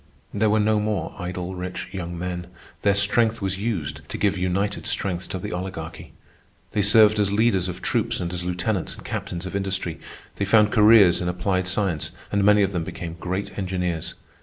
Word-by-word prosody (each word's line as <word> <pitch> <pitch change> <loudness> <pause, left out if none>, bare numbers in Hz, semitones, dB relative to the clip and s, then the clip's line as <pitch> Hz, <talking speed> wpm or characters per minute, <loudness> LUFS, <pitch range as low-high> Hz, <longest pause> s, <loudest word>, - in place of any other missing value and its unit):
There 105 +1 +2
were 110 +1 +3
no 105 0 +3
more 105 -1 -2
idle 90 0 -4
rich 90 0 -5
young 85 -3 -5
men. 90 0 -4 0.3
Their 100 -1 +3
strength 110 +3 +3
was 95 -1 -2
used 100 -9 -3
to - - -4
give 100 -1 +1
united 95 +3 -1
strength 90 -2 -2
to - - -3
the 90 - -5
Oligarchy. 90 -3 -6 0.6
They 105 - +1
served 105 +1 +6
as 100 -1 +2
leaders 100 -3 +2
of 90 - -7
troops - - 0
and 85 0 -3
as 90 -1 -3
lieutenants 90 +2 -2
and - - -13
captains 85 +1 -4
of 95 - -5
industry. 95 -4 -2 0.4
They 100 - 0
found 105 +1 +4
careers 105 -5 +6
in 90 - -2
applied 95 +1 -1
science, 95 -5 -1 0.2
and 100 0 +2
many 105 0 +5
of 100 - 0
them 90 -4 -2
became 80 +1 -6
great 95 +3 -3
engineers. 90 -3 -2
95 Hz, 185 wpm, -24 LUFS, 90-105 Hz, 0.6 s, served